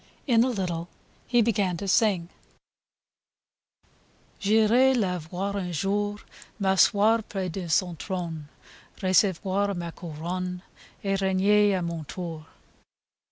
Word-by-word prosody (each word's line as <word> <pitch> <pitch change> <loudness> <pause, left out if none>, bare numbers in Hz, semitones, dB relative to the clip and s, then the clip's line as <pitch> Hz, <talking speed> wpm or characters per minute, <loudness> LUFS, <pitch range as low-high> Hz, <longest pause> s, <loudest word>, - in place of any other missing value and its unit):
In 235 -4 +4
a 260 - +1
little 175 -6 -3 0.4
he 240 -2 +4
began 200 -5 0
to 200 - -5
sing: 190 -5 +2 2.1
J'irai 225 +5 +4
la 185 -5 0
voir 185 +5 -4
un 180 -3 -3
jour, 205 +5 -1 0.4
M'asseoir 205 +3 +4
pres 190 -3 -3
de 175 0 -5
son 175 +2 +1
trone, 165 -5 -5 0.5
Recevoir 190 +1 +1
ma 170 -1 -4
couronne 180 +3 -5 0.4
Et 195 -1 0
regner 200 +2 +3
a 180 - -2
mon 170 -2 -4
tour 165 -1 -7
190 Hz, 115 wpm, -26 LUFS, 175-205 Hz, 2.1 s, In